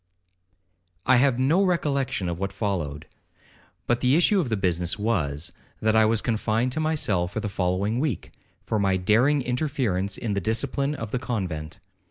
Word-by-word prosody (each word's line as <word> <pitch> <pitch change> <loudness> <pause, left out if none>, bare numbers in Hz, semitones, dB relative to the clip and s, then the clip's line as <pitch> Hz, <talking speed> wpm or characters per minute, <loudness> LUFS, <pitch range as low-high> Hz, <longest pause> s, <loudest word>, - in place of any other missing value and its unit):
'I 130 - +5
have 130 -1 +3
no 150 +10 +3
recollection 140 - 0
of 85 0 -3
what 100 0 -2
followed; 85 -8 -3 0.8
but 120 0 +1
the 125 +2 +3
issue 185 +4 +4
of 150 -9 -1
the 110 - 0
business 90 -2 0
was, 85 -9 -1 0.3
that 110 0 +2
I 110 0 +6
was 110 0 +2
confined 115 +2 0
to 155 - -2
my 155 0 +1
cell 90 - 0
for 105 - -4
the 105 - -3
following 100 +4 -1
week, 145 - -2 0.3
for 110 - 0
my 95 -1 +2
daring 125 +10 +3
interference 125 -7 -1
in 110 -4 -2
the 100 - -1
discipline 140 - -1
of 110 -5 -6
the 125 - -1
convent. 90 -12 -4
110 Hz, 175 wpm, -25 LUFS, 95-130 Hz, 0.8 s, I